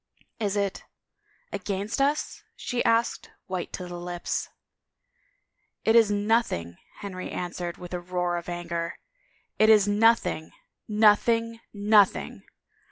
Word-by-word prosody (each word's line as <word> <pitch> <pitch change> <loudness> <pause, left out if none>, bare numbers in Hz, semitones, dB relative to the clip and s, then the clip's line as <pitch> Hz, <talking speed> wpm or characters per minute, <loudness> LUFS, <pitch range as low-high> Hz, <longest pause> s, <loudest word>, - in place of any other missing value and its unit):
It 205 -2 -1
is 200 -1 -1 0.3
— - - -52 0.3
against 200 +5 -2
us?" 290 +2 0
she 245 -1 -2
asked, 230 +1 +1 0.2
white 185 -2 -4
to 180 - -5
the 175 0 -7
lips. 175 0 -3 1.4
It 225 - +4
is 225 -3 +6
nothing!'^ 205 - 0 0.2
Henry 185 -2 -6
answered 175 -1 -4
with 180 0 -9
a 180 - -2
roar 175 0 -2
of 170 +1 -6
anger. 170 -1 -4 0.6
"It 215 - +6
is 210 -2 +6
nothing 210 -6 +2 0.2
— - - -60
nothing 225 +2 +3
— - - -53 0.2
nothing! 205 -3 +4
200 Hz, 130 wpm, -26 LUFS, 175-220 Hz, 1.4 s, is